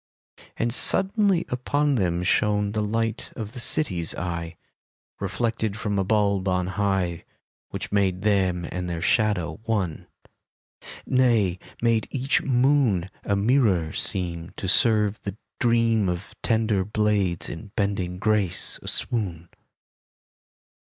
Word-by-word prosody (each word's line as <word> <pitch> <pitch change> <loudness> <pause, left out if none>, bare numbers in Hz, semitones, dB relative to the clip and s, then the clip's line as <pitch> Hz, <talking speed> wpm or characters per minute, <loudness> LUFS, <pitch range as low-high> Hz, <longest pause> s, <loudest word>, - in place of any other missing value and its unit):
And 115 0 0
suddenly 195 - +3
upon 145 +4 0
them 90 -7 0
shone 105 +2 +1
The 110 0 -1
light 115 +2 -2
of 110 -1 -6
the 125 - -6
City's 95 - +2
eye, 85 -1 -4 0.6
Reflected 110 +1 -2
from 105 -2 -2
a - - +2
buib 100 -1 +1
on 90 -1 +1
high. 95 -3 -1 0.5
Which - - -6
made 95 -2 +1
them 95 -5 +1
and 90 -1 -4
their 85 -1 -3
shadow 105 -5 +1
one. 100 -8 -2 1.0
Nay, 115 -9 +2 0.2
made 115 -2 +2
each 135 +1 0
moon 125 -8 +2
A 100 - 0
mirror 100 - +2
seem 85 -2 0
To 95 - -4
serve 105 0 +3
the 100 0 -6 0.2
dream 115 -4 +2
Of 90 +2 -5
tender 110 -4 +1
blades 105 -4 0
in 100 +5 -8
bending 100 -4 -1
grace 105 -3 +2
a - - -11
swoon. 90 -8 -2
105 Hz, 125 wpm, -24 LUFS, 90-115 Hz, 1.0 s, suddenly